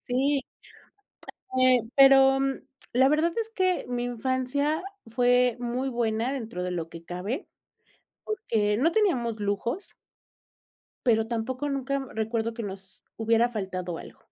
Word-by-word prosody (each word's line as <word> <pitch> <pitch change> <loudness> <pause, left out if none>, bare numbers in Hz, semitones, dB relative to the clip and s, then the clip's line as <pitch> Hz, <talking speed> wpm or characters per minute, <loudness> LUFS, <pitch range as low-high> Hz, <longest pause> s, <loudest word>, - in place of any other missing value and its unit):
Sí. 275 +3 +1 1.2
Eh, 255 -2 +5
pero 270 -1 +7 0.5
la 260 +2 +5
verdad 310 +4 +2
es 450 0 -4
que 370 -1 +1
mi 245 -1 -2
infancia 260 +6 -1 0.2
fue 245 +1 +3
muy 245 +2 -2
buena 235 0 0
dentro 225 -9 -4
de 180 - -2
lo 170 -2 -3
que 165 0 -11
cabe, 195 - -4 0.8
porque 215 - 0
no 310 +8 +3
teníamos 255 - +1
lujos. 210 - -3 1.1
Pero 225 -1 +3
tampoco 255 +5 -2
nunca, 275 0 -1
mm, 270 - -7
recuerdo 225 +1 -1
que 230 0 -6
nos 195 -1 -9 0.2
hubiera 230 +1 +3
faltado 185 -6 -4
algo. - - -12
245 Hz, 130 wpm, -27 LUFS, 220-270 Hz, 1.2 s, pero